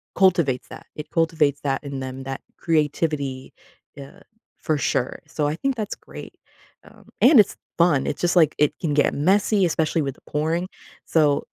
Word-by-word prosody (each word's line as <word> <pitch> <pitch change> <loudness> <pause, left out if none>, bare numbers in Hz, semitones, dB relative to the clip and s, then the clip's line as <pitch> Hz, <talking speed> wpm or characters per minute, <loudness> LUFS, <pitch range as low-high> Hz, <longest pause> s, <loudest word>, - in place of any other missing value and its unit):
cultivates 170 -9 +2
that. - - -11
It 150 - -8
cultivates 155 -4 +1
that 135 0 -2
in 140 -2 -5
them, 130 0 -6
that 135 0 -6 0.2
creativity 150 -4 -1 0.4
yeah, 140 -1 -12 0.4
for 155 -3 -1
sure. 130 -2 -1
So, 150 -1 -1
I 150 - -1
think 270 +8 -1
that's 215 -3 -4
great, - - -12 0.5
um, - - -19 0.2
and 265 0 +7
it's 210 - +4 0.2
fun. 165 -6 +3
It's - - -3
just 175 +1 +1
like 160 -4 +4
it 150 - +2
can 155 -4 -1
get 145 - +2
messy, 195 +5 +2
especially 160 -1 0
with 135 -1 -4
the - - -24
pouring, 160 +4 -1 0.4
so 150 -3 +2
150 Hz, 170 wpm, -23 LUFS, 140-170 Hz, 0.5 s, and